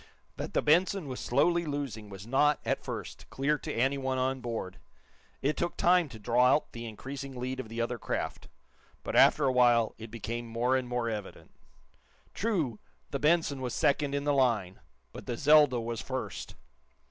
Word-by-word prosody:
That - - -6
the - - +2
"Benson" 175 +2 +3
was 130 -2 -5
slowly 170 +7 +2
losing 140 -9 -4
was 100 0 -9
not, 145 +5 +3
at - - -1
first, - - -7
clear 145 +2 0
to - - -5
anyone 130 +2 0
on 130 +1 0
board. 115 -6 -5 0.6
It 145 +3 +1
took 175 - -2
time 175 -3 +4
to 115 - -10
draw 120 +3 +3
out 150 - -3
the 115 0 -7
increasing 135 +4 -7
lead 130 +1 -3
of 115 - -6
the 115 +1 -3
other 120 0 -2
craft, - - -4 0.6
but, - - -4
after 150 - +6
a 130 - +3
while, 120 -3 +4
it 115 0 -8
became 115 +1 -5
more 120 +3 +1
and 130 -1 -1
more 120 -1 -1
evident. 105 -3 -6 0.8
True, 165 - -1 0.3
the 140 - -2
"Benson" 150 -3 +2
was 125 -2 -3
second 140 0 +1
in 140 - -1
the 145 0 +1
line 115 -9 +1 0.3
but - - -10
the 120 - -3
"Zelda" 145 -3 +5
was 115 -2 -4
first. - - -5
130 Hz, 180 wpm, -30 LUFS, 115-145 Hz, 0.8 s, after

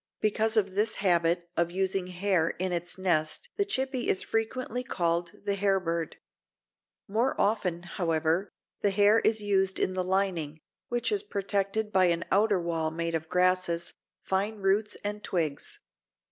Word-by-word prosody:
Because 220 +1 +1
of 195 -3 +2
this 210 +3 +1
habit 175 -2 +2
of 170 0 +1
using 190 0 -1
hair 180 -2 +1
in 185 +1 -1
its 175 +1 -2
nest 180 - 0
the 405 - +3
Chippy 265 -8 -1
is 185 - +2
frequently 245 +2 -2
called 170 -6 -1
the 200 - +1
Hairbird. 185 -5 0 0.9
More 230 +6 0
often, 180 -5 +1
however, 170 +1 0 0.3
the 205 - +2
hair 205 +2 +5
is 220 -1 +2
used 195 -2 +1
in 185 - +1
the 185 0 -1
lining, 180 -5 0 0.3
which 240 - -1
is 410 -1 +2
protected 200 - -1
by 190 -1 +5
an 170 -1 +1
outer 205 -1 +3
wall 165 -2 -1
made 165 +1 -3
of 160 0 -3
grasses, 180 -2 +1 0.3
fine 200 +3 0
roots 205 +1 0
and 210 0 -3
twigs. 155 -6 -3
190 Hz, 150 wpm, -28 LUFS, 170-210 Hz, 0.9 s, hair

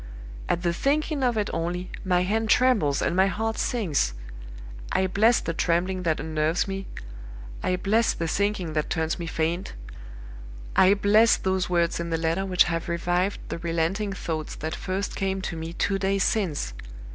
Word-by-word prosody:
At 170 - 0
the 170 -1 +1
thinking 290 - 0
of 245 -3 +1
it 210 -1 0
only, 175 +2 -3
my 180 -2 +2
hand 220 +4 0
trembles 205 - +3
and - - 0
my 190 +1 +4
heart 220 +2 -2
sinks. 155 - 0 0.8
I 190 - +2
bless 215 +5 +3
the 165 - -3
trembling 180 +3 0
that 165 -3 0
unnerves 155 +3 0
me! 195 0 -5 0.7
I 185 - +1
bless 215 +5 +2
the 165 - -3
sinking 195 -2 -1
that 150 -1 -1
turns 160 +1 -1
me 170 - -4
faint! 165 - -2 1.0
I 190 +2 +6
bless 210 +3 +5
those 190 -1 -1
words 170 -2 +1
in 170 0 -3
the 165 - 0
letter 165 +4 -1
which 180 -2 +5
have 165 0 -3
revived 175 +3 0
the - - -4
relenting 170 +5 -1
thoughts 160 -4 -4
that 160 +2 -4
first 190 +3 -3
came 195 -1 -1
to 175 - -3
me 160 0 -5
two 195 +3 -1
days 195 0 +1
since! 170 - -1
180 Hz, 170 wpm, -25 LUFS, 165-200 Hz, 1.0 s, I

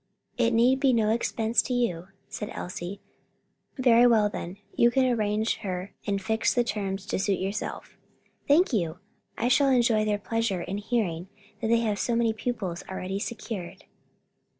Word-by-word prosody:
"It 235 -2 +2
need 240 +3 +3
be 270 -2 +3
no 220 -2 +2
expense 225 0 +1
to 250 - -3
you," 180 -8 -1 0.2
said 210 - -6
Elsie. 180 +2 -6 0.8
"Very 245 -2 +6
well 220 -3 +4
then, 180 -1 -6 0.2
you 235 - +5
can 260 +2 +2
engage 220 -3 0
her 185 -1 -5
and 200 -1 0
fix 220 +3 0
the 245 - +3
terms 195 -4 -3
to - - -2
suit 195 0 +1
yourself." 195 +3 -5 0.5
"Thank 300 +1 +4
you; 170 -7 0 0.4
I 240 - 0
shall 275 +2 +4
enjoy 235 -4 +3
their 210 -1 +1
pleasure 205 -2 -1
in 200 +2 -4
hearing 200 -6 -1 0.3
that - - -1
they 230 +1 +3
have 210 -3 -1
so 235 - 0
many 230 -1 +2
pupils 210 -6 -4
already 190 +1 -4
secured." 215 -5 -6
220 Hz, 165 wpm, -27 LUFS, 195-235 Hz, 0.8 s, Very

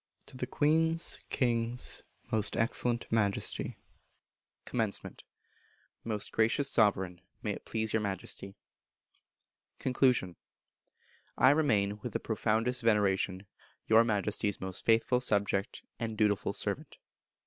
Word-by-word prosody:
To 135 - -14
the 130 - -3
Queen's 160 +2 +1
(King's) 120 -1 +1 0.3
Most 105 -1 0
Excellent 120 +1 +1
Majesty. 105 -3 +1 0.9
Commencement. - - -3 0.8
Most 105 -3 -3
Gracious 115 +5 +2
Sovereign; 95 -5 +2 0.2
May - - -1
it - - -7
please 110 -1 -2
your 110 - +2
Majesty. 100 -1 -4 1.2
Conclusion. 125 - +1 1.0
I 130 +2 +6
remain, 105 -9 +2
with 120 -4 -5
the - - 0
profoundest 115 +3 0
veneration, 100 -3 +1 0.4
Your 110 +1 +6
Majesty's 105 -2 -1
most 95 -1 -5
faithful 115 +2 +3
subject 100 -4 0 0.2
and 110 -2 -3
dutiful 105 -2 +1
servant. - - -3
110 Hz, 105 wpm, -31 LUFS, 100-120 Hz, 1.2 s, I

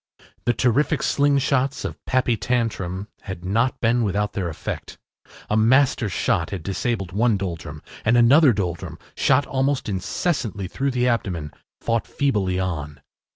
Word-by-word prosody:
The 120 - +3
terrific 130 +5 +1
slingshots 140 -1 +1
of - - -6
Pappy 130 -2 +2
Tantrum 105 -6 -2
had 95 -2 -7
not 115 +7 +1
been 120 +1 +2
without 105 0 -1
their 90 -4 -2
effect. 80 - -6 0.5
A 105 - 0
master 120 0 +3
shot 85 - 0
had 95 -5 -5
disabled 95 0 -2
one 110 +2 +2
Doldrum, 85 -6 -6 0.2
and 115 +2 +3
another 135 +5 +6
Doldrum, 90 -5 -3 0.2
shot 135 +1 +3
almost 135 -1 0
incessantly 100 - -2
through 135 +9 -2
the 125 -1 +1
abdomen, 90 -11 -1 0.3
fought 115 -1 0
feebly 100 -10 0
on. 75 -6 -4
110 Hz, 140 wpm, -23 LUFS, 95-130 Hz, 0.5 s, another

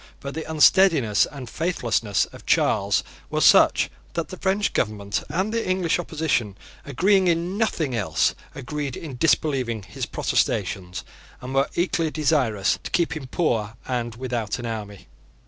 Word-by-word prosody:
But 140 0 -6
the 160 0 -6
unsteadiness 155 - +4
and 135 -4 -8
faithlessness 120 - 0
of - - -13
Charles 100 -1 +2 0.3
were - - -1
such - - +5 0.3
that 170 - -3
the 185 - -8
French 195 +2 0
Government 105 -2 -1
and 195 +5 -1
the 230 -4 -1
English 185 -2 +1
opposition, 150 - -1 0.3
agreeing 185 +7 +2
in 170 +2 0
nothing 170 - 0
else, 105 -4 +1 0.2
agreed 140 0 -4
in 150 -6 -7
disbelieving 130 -7 +1
his 90 - -5
protestations, 90 -1 -1 0.4
and 130 +1 -7
were 135 +1 +2
equally 170 -2 +1
desirous 135 -10 +1
to - - -6
keep 170 -2 0
him 140 -4 -6
poor 115 -8 -1
and 120 -3 -2
without 120 -4 -3
an 120 - -6
army. 105 -3 -6
140 Hz, 145 wpm, -24 LUFS, 115-170 Hz, 0.4 s, such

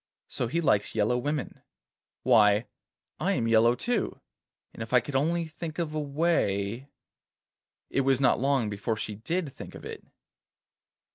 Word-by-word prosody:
'So 120 - -2
he 165 +8 -1
likes 110 -11 +1
yellow 110 +3 +2
women! 145 +3 -3 0.6
Why, 105 +1 +5 0.5
I - - +1
am 115 - 0
yellow 115 +1 +5
too, 240 - -1 0.5
and - - -10
if 115 +2 -6
I 125 - +7
could 135 +4 -7
only 165 +5 +1
think 160 0 -7
of 165 -3 -2
a 155 - -1
way——' 140 -7 0 1.0
It 135 - +2
was 135 -1 +2
not 135 - +3
long 135 -3 +2
before 105 +2 -2
she 110 - -4
did 150 - -3
think - - -10
of - - -10
it. - - -7
130 Hz, 155 wpm, -28 LUFS, 110-155 Hz, 1.0 s, I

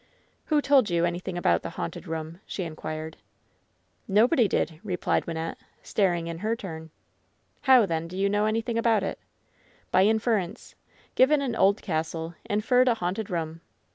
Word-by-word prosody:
''Who 300 -2 +3
told 270 -7 +4
you 170 -1 +2
anything 175 +1 -3
about 85 - +2
the - - -5
haunted - - -5
room 160 -1 -4
V* 170 - -15
she 190 - -4
inquired. 155 -1 -6 0.9
"Nobody 230 +4 +4
did," 160 -3 -1
replied 185 -4 -1
Wynnette, 165 0 -4 0.3
staring 175 -5 +1
in 165 0 -5
her 220 +4 0
turn. 160 -7 -8 0.7
"How, 260 -4 +6
then, 165 -2 -2
did 180 +2 -8
you 195 +1 +2
know 205 +1 +1
anyrfiing 225 +2 0
about 225 -3 +2
it?" - - -3 0.7
"By 185 - +5
inference. 220 -4 0 0.4
Given 285 +3 +4
an 245 -4 -2
old 200 -1 +3
castle, 165 -1 -3 0.2
inferred 245 +5 +3
a 240 - +4
haunted 195 +1 -3
room. 165 -2 -3
190 Hz, 160 wpm, -26 LUFS, 165-225 Hz, 0.9 s, How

